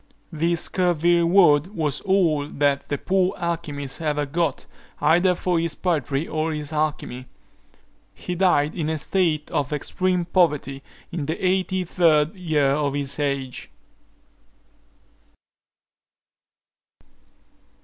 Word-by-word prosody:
This 165 Hz, +1 st, 0 dB
scurvy 175 Hz, -2 st, +2 dB
reward 170 Hz, 0 st, +4 dB
was 150 Hz, -3 st, -1 dB
all 170 Hz, -7 st, +1 dB
that 140 Hz, -1 st, 0 dB
the 145 Hz, -, -1 dB
poor 185 Hz, +2 st, 0 dB
alchymist 160 Hz, -5 st, -4 dB
ever 150 Hz, -2 st, -1 dB
got 155 Hz, 0 st, -2 dB, 0.3 s
either 175 Hz, +4 st, +3 dB
for 175 Hz, -1 st, 0 dB
his 165 Hz, -1 st, -2 dB
poetry 150 Hz, -4 st, -1 dB
or 155 Hz, +1 st, -2 dB
his 150 Hz, 0 st, -4 dB
alchymy. 150 Hz, -4 st, -3 dB, 0.9 s
He 180 Hz, -, -5 dB
died 170 Hz, -5 st, +2 dB
in 155 Hz, -3 st, -2 dB
a 160 Hz, -, -1 dB
state 155 Hz, -1 st, -1 dB
of 140 Hz, -1 st, -1 dB
extreme 180 Hz, +4 st, -1 dB
poverty, 150 Hz, -6 st, +1 dB, 0.3 s
in 165 Hz, -5 st, -4 dB
the 160 Hz, -, -2 dB
eighty 185 Hz, 0 st, +1 dB
third 160 Hz, -3 st, +2 dB
year 155 Hz, -7 st, +1 dB
of 140 Hz, 0 st, 0 dB
his 140 Hz, 0 st, 0 dB
age. 140 Hz, -3 st, -3 dB
160 Hz, 115 wpm, -23 LUFS, 145-175 Hz, 0.9 s, reward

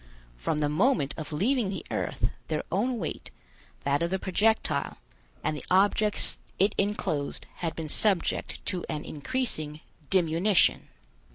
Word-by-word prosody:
From -, -, -1 dB
the 150 Hz, -1 st, +2 dB
moment 150 Hz, -, +2 dB
of 155 Hz, -1 st, -6 dB
leaving 215 Hz, -, +1 dB
the 195 Hz, -, -4 dB
earth, -, -, -1 dB, 0.2 s
their -, -, -1 dB
own 250 Hz, 0 st, +1 dB
weight, 165 Hz, -8 st, -4 dB, 0.5 s
that 140 Hz, +2 st, +1 dB
of 170 Hz, -, +1 dB
the 190 Hz, -, +1 dB
projectile, 210 Hz, +4 st, +1 dB, 0.5 s
and 155 Hz, -, 0 dB
the -, -, -6 dB
objects 205 Hz, +3 st, +3 dB, 0.2 s
it 200 Hz, +3 st, +3 dB
enclosed, 175 Hz, -8 st, -1 dB
had 165 Hz, -2 st, -2 dB
been 160 Hz, -1 st, -4 dB
subject 195 Hz, +3 st, 0 dB
to 180 Hz, -3 st, -1 dB
an 150 Hz, -, -3 dB
increasing 155 Hz, -, -2 dB, 0.3 s
diminution. 180 Hz, +1 st, +4 dB
180 Hz, 135 wpm, -28 LUFS, 150-210 Hz, 0.5 s, diminution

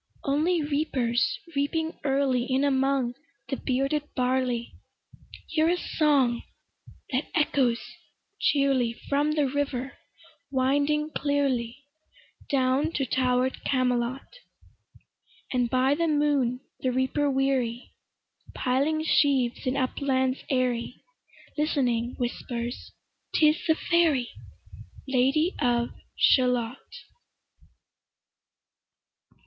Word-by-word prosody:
Only 310 Hz, +4 st, +1 dB
reapers, 275 Hz, -5 st, 0 dB, 0.2 s
reaping 320 Hz, +3 st, -1 dB
early 270 Hz, -3 st, +1 dB
In 265 Hz, +1 st, +1 dB
among 270 Hz, -2 st, +1 dB, 0.4 s
the 270 Hz, -, -1 dB
bearded 275 Hz, +4 st, 0 dB
barley, 250 Hz, -2 st, 0 dB, 0.8 s
Hear 320 Hz, 0 st, +2 dB
a 355 Hz, -, +2 dB
song 280 Hz, -8 st, +2 dB, 0.7 s
that 260 Hz, +2 st, -1 dB
echoes 265 Hz, -6 st, +2 dB, 0.6 s
cheerly 270 Hz, -5 st, +2 dB
From 290 Hz, +2 st, +1 dB
the 300 Hz, -2 st, +2 dB
river 270 Hz, -1 st, -3 dB, 0.5 s
winding 285 Hz, +3 st, +1 dB
clearly, 275 Hz, -4 st, -1 dB, 0.7 s
Down 270 Hz, +3 st, +2 dB
to 270 Hz, -, 0 dB
tower'd 255 Hz, +1 st, 0 dB
Camelot: 250 Hz, 0 st, 0 dB, 1.3 s
And 245 Hz, -2 st, +1 dB
by 260 Hz, +2 st, +3 dB
the 335 Hz, +3 st, 0 dB
moon 290 Hz, -5 st, +1 dB, 0.2 s
the 255 Hz, -, 0 dB
reaper 260 Hz, +3 st, +1 dB
weary, 265 Hz, -3 st, 0 dB, 0.6 s
Piling 285 Hz, +5 st, 0 dB
sheaves 270 Hz, -6 st, +2 dB
in 255 Hz, +2 st, 0 dB
uplands 260 Hz, 0 st, 0 dB
airy, 250 Hz, -2 st, -1 dB, 0.6 s
Listening, 250 Hz, -6 st, 0 dB
whispers 240 Hz, 0 st, -4 dB, 0.4 s
"'Tis 305 Hz, +1 st, +3 dB
the 320 Hz, -, +4 dB
fairy 320 Hz, -9 st, +2 dB, 0.8 s
Lady 270 Hz, +7 st, +2 dB
of 240 Hz, -1 st, +1 dB, 0.3 s
Shalott". 250 Hz, -1 st, +3 dB
265 Hz, 90 wpm, -26 LUFS, 250-290 Hz, 1.3 s, the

